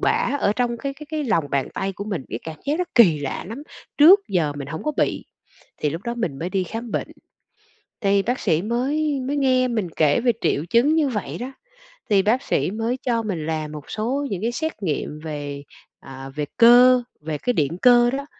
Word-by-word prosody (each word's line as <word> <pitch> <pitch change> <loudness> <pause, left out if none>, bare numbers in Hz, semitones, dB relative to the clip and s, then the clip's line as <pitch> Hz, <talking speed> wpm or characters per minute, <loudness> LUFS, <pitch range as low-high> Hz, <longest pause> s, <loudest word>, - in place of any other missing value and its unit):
bã - - +1
ở 200 - +2
trong 245 -1 0
cái 275 +2 -4
cái 300 +2 -11
cái 310 -2 -2
lòng 170 - +1
bàn 140 -2 0
tay 195 0 -2
của 200 +2 -7
mình, 195 -10 -4
cái 115 - -3
cảm 160 -1 -7
giác 295 +4 0
nó 360 - +1
kỳ 180 -11 +6
lạ 140 - -4
lắm, 250 +6 -7 0.4
trước 360 +8 +8
giờ 165 -6 0
mình 140 -1 -6
hổng 160 +2 -6
có 305 - 0
bị. - - 0 0.6
Thì 150 - +1
lúc 165 +5 -5
đó 235 +2 -3
mình 175 -13 -3
mới 170 +4 -4
đi 190 -1 0
khám 225 +5 -6
bệnh, - - -2 0.9
thì 200 -2 +2
bác 245 +5 -2
sĩ 160 +1 +1
mới 275 +6 -1
mới 270 +3 -2
nghe 255 -2 +2
mình 220 -7 -1
kể 150 +3 +3
về 240 0 +3
triệu 145 - 0
chứng 255 +7 +4
như 305 -3 +2
vậy 220 -6 -4
đó, 255 +2 -5 0.6
thì 200 -2 +4
bác 220 +6 +2
sĩ 185 - 0
mới 225 +4 -2
cho 235 -3 0
mình 180 -8 -3
làm 155 -1 -3
một 150 -2 -9
số 255 +7 -2
những 190 - -3
cái 230 +2 0
xét 315 -4 -4
nghiệm 150 -2 -3
về, 145 -2 -5 0.4
à, 135 0 -10
về 150 -1 -2
cơ, 245 +2 +7 0.2
về 155 0 -4
cái 245 +11 -1
điện 155 - 0
cơ 240 -1 +6
đó. 275 +1 -3
225 Hz, 220 wpm, -22 LUFS, 160-255 Hz, 0.9 s, trước